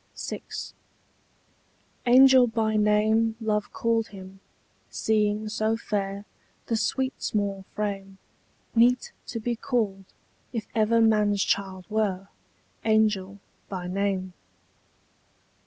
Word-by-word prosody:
VI. - - -5 1.7
Angel 260 0 +7
by 220 -1 0
name 215 +1 +3
love 210 -2 -1
called 230 -1 0
him, 190 -2 -12 0.5
seeing 215 0 0
so 215 +1 0
fair 200 -2 -3 0.4
The 230 - -1
sweet 260 +4 -1
small 200 -2 -2
frame; 195 -2 -4 0.6
Meet 250 - +3 0.2
to 230 - -4
be 235 +2 -2
called, 220 -7 -1 0.5
if 225 -4 -3
ever 230 +1 +3
man's 210 -2 +3
child 190 -2 -1
were, 200 -3 -1 0.5
Angel 215 -3 +2 0.3
by 185 -2 -5
name. 185 0 -2
215 Hz, 100 wpm, -26 LUFS, 195-225 Hz, 1.7 s, Angel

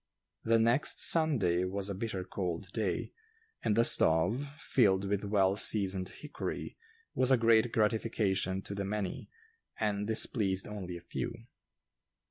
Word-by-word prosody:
The 115 0 +3
next 115 +5 +2
Sunday 115 - +3
was 95 +1 -3
a 100 - -3
bitter 95 -1 -4
cold 90 0 -5
day, 100 -5 -3 0.5
and 105 - +1
the 115 - +4
stove, 110 - +3
filled 100 -11 +2
with 100 0 -1
well 100 -2 +2
seasoned 95 -3 +1
hickory, 150 - -6 0.4
was 130 - +2
a 130 - +5
great 115 0 +3
gratification 105 -4 0
to - - -5
the 100 0 -3
many, 100 -1 -4 0.5
and 105 -1 -1
displeased 105 -4 +1
only 95 -4 -6
a - - -12
few. 115 +6 -6
100 Hz, 135 wpm, -31 LUFS, 95-115 Hz, 0.5 s, a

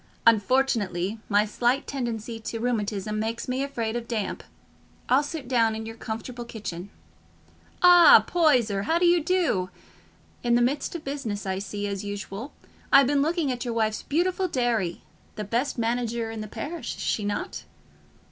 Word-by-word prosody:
Unfortunately, 220 -4 +2
my 205 0 +4
slight 240 +5 0
tendency 235 -4 -4
to 225 +1 -5
rheumatism 215 -3 -1
makes 225 +2 -3
me 255 +1 -1
afraid 235 -5 -3
of 235 -1 -4
damp: 220 -4 -3 0.7
I'll 260 +3 +5
sit 290 -2 -6
down 230 -3 +2
in 220 0 -5
your 225 0 -7
comfortable 230 +2 -6
kitchen. 200 -5 -7 0.9
Ah, 355 -1 +9
Poyser, 245 - +2
how 330 - +3
do 350 - +2
you 345 -2 +4
do? 330 - +1 0.7
In 240 -1 +2
the 240 - +3
midst 280 +7 -1
of 330 - -5
business, 255 -8 -4
I 190 0 -2
see, 205 +1 -4
as 200 -1 -3
usual. 205 +5 -6 0.4
I've 275 0 +8
been 280 +2 +2
looking 315 -1 +1
at 245 -1 -3
your 240 -2 -3
wife's 220 -1 0
beautiful 365 +4 0
dairy—the 225 - -3
best 235 +8 -1
manager 230 -1 -1
in 225 -1 -5
the 215 - -6
parish, 295 +4 -5
is - - -7
she 215 - 0
not?" 205 0 -4
235 Hz, 160 wpm, -26 LUFS, 215-275 Hz, 0.9 s, Ah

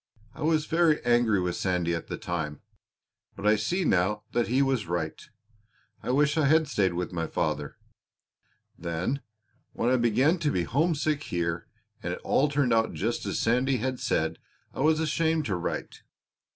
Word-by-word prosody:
I - - -12
was 155 0 +2
very 165 -2 +3
angry 120 -4 +3
with 90 -1 -1
Sandy 90 -2 0
at 85 - -4
the - - -4
time, 80 -4 -4 0.7
but 100 - -7
I 105 +1 +5
see 170 - -1
now 100 +1 +1
that 120 -1 +1
he 130 +4 +3
was 130 -8 0
right. 80 -2 -3 0.8
I - - -6
wish 145 +4 +2
I 155 - +3
had 160 +2 +4
stayed 95 - +1
with 90 +1 -3
my 80 -2 -2
father. 75 -4 -2 1.0
Then 85 - -2 0.5
when 120 - 0
I 130 - +4
began 130 - +3
to 155 -3 +1
be 90 - 0
homesick 150 - +1
here 85 -1 -2 0.3
and - - -3
it - - -6
all 145 +2 +2
turned 140 -4 +2
out 115 0 +2
just 115 +4 -2
as - - -1
Sandy 125 +3 +2
had 130 +2 -2
said - - 0 0.3
I - - -8
was 155 +3 +3
ashamed 160 0 +1
to 100 - -1
write. 90 - -4
120 Hz, 175 wpm, -27 LUFS, 90-150 Hz, 1.0 s, I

